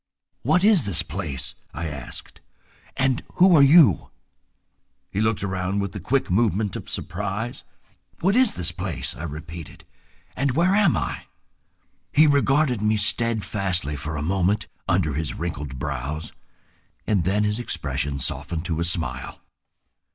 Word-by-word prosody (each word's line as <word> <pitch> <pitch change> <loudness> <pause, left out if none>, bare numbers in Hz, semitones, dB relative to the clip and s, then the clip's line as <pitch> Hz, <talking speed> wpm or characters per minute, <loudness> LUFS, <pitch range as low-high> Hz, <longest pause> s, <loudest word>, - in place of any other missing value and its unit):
"What 160 +8 +2
is 200 - +5
this 95 - 0
place," 65 - -5 0.2
I 85 +3 -4
asked, 70 -5 -9 0.6
"and 130 -1 +1
who 185 -1 +6
are 145 - +7
you?" 140 - +6 1.0
He 100 - -1
looked 110 -2 0
around 95 0 -1
with 100 -2 -2
the 105 - -6
quick 125 +4 0
movement 105 -1 +1
of - - -7
surprise. 105 +5 -4 0.6
"What 195 +4 +2
is 255 -3 +4
this 85 -1 -1
place?" 85 -1 -4
I - - -9
repeated, 80 +1 -8 0.5
"and 140 -1 0
where 175 +6 +3
am 200 -5 +4
I?" - - -3 0.9
He 155 +3 +6
regarded 140 -4 +3
me 110 0 +2
steadfastly 100 -7 +1
for 75 +2 -5
a 75 - -3
moment 95 +4 +1 0.2
under 75 - +1
his 75 +1 -3
wrinkled 75 -5 -5
brows, 70 +3 -4 0.7
and 100 -5 +1
then 100 +4 +1
his 105 +2 0
expression 70 - -3
softened 80 +5 -2
to 80 -2 -2
a - - +1
smile. 85 -1 0
100 Hz, 145 wpm, -24 LUFS, 80-125 Hz, 1.0 s, are